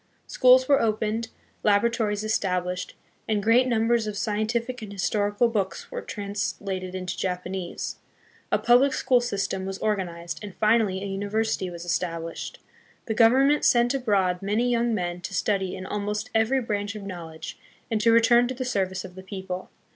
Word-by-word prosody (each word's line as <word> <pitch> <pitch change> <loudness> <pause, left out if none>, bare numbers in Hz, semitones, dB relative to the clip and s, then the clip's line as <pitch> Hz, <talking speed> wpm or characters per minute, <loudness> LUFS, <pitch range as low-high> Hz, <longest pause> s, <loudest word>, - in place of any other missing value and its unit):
Schools 255 0 +5
were 280 -1 +4
opened, 220 0 0 0.4
latoratories 210 0 +2
established, 180 -4 -1 0.3
and 210 -2 +1
great 235 +4 +4
numbers 230 -1 +2
of 210 -1 -4
scientific 230 +4 -1
and 210 -2 -7
historical 205 +3 +1
books 205 - -3
were - - -4
trans 200 -2 -3
lated 185 -2 -4
into 185 -1 -4
Japanese. 180 -1 -4 0.5
A - - +4
public 255 +3 +4
school 255 -2 +3
system 195 -5 -2
was 190 0 -4
organized, 175 -6 -2
and 205 -3 -8
finally 215 -3 +2
a - - -3
university 205 0 -1
was 170 0 -8
established. 165 -1 -3 0.5
The 220 - -1
Government 260 +6 +4
sent 240 0 +4
abroad 200 -9 +1
many 215 +5 +1
young 235 0 +1
men 175 -2 -3
to 190 +2 -5
study 190 -1 0
in 185 0 -7
almost 210 +4 -3
every 225 +4 +2
branch 205 -2 -3
of 210 - -7
knowledge 165 -4 -8 0.3
and 215 -1 +1
to 230 +1 +5
return 235 +1 +5
to 260 - -4
the 255 0 -3
service 190 -6 -1
of 185 - -10
the 190 - -10
people. 190 -1 -6
210 Hz, 160 wpm, -25 LUFS, 190-235 Hz, 0.5 s, Schools